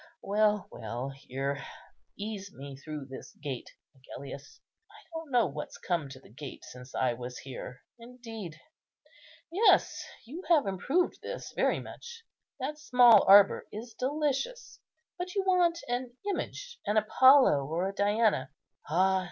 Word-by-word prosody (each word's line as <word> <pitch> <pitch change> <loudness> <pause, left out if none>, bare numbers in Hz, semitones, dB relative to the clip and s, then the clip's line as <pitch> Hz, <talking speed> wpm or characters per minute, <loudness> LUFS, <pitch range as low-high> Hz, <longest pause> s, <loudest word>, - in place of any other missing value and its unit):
Well, 210 0 +2
well,—here! 135 +4 -4 0.5
ease 200 -1 -5
me 140 0 -9
through 150 0 -7
this 135 0 -10
gate, 140 -4 -5 0.3
Agellius; 135 +1 -10 0.3
I 415 - -17 0.2
don't 325 -2 -6
know 245 -3 +4
what's 150 -2 -6
come 170 -6 -2
to 135 -1 -10
the - - -18
gate 135 +3 -9
since 125 +1 -11
I 130 - +2
was 125 +1 -7
here. 125 -1 -8 0.2
Indeed!—yes! 230 -8 -9 1.7
you 305 +10 -7
have 315 -8 +5
improved 270 - 0
this - - -6
very - - +2
much. 470 -1 -10 0.4
That 295 +4 -4
small 245 -7 +7
arbour 200 0 +7
is 225 +2 -8
delicious; 290 - -2 0.4
but 360 +2 -4
you 395 - +1
want 355 -3 +3
an 245 0 -3
image, 480 +4 -4
an 210 +1 +2
Apollo 235 - +6
or 170 +5 -1
a 195 - -4
Diana. 205 - +2 0.4
Ah! 190 +4 +3
205 Hz, 135 wpm, -30 LUFS, -, 1.7 s, small